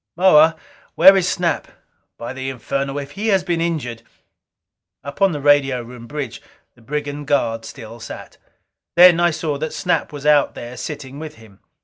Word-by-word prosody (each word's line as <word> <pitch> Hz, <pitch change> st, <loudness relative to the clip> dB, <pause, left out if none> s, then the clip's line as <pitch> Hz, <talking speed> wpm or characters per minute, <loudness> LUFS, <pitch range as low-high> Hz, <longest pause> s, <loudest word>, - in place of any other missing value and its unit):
"Moa, 165 Hz, -3 st, +5 dB, 0.4 s
where 190 Hz, +4 st, +8 dB
is 185 Hz, -2 st, +1 dB
Snap? 175 Hz, -3 st, -1 dB, 0.5 s
By 120 Hz, +2 st, -6 dB
the 130 Hz, 0 st, -5 dB
infernal 135 Hz, +2 st, -3 dB
if 140 Hz, 0 st, -6 dB
he 205 Hz, +6 st, -4 dB
has 195 Hz, -4 st, +2 dB
been 175 Hz, -2 st, -1 dB
injured 145 Hz, -9 st, -3 dB, 0.5 s
" -, -, -65 dB
Up 140 Hz, +7 st, -9 dB
on 195 Hz, -1 st, +5 dB
the 150 Hz, -, -4 dB
radio 140 Hz, -3 st, +3 dB
room 120 Hz, 0 st, -11 dB
bridge, 145 Hz, -5 st, -6 dB, 0.3 s
the 120 Hz, -, -23 dB
brigand 145 Hz, +3 st, -5 dB
guard 115 Hz, -6 st, 0 dB
still 115 Hz, +1 st, -10 dB
sat. -, -, -10 dB, 0.6 s
Then 175 Hz, -1 st, +7 dB
I 175 Hz, 0 st, +4 dB
saw 150 Hz, -3 st, -3 dB
that 155 Hz, +1 st, -4 dB
Snap 180 Hz, -, -1 dB
was 145 Hz, -1 st, -9 dB
out 150 Hz, -1 st, +3 dB
there 120 Hz, +1 st, -8 dB
sitting 140 Hz, -2 st, -7 dB
with 155 Hz, -1 st, -8 dB
him. 110 Hz, -4 st, -18 dB
145 Hz, 175 wpm, -20 LUFS, 130-165 Hz, 0.6 s, where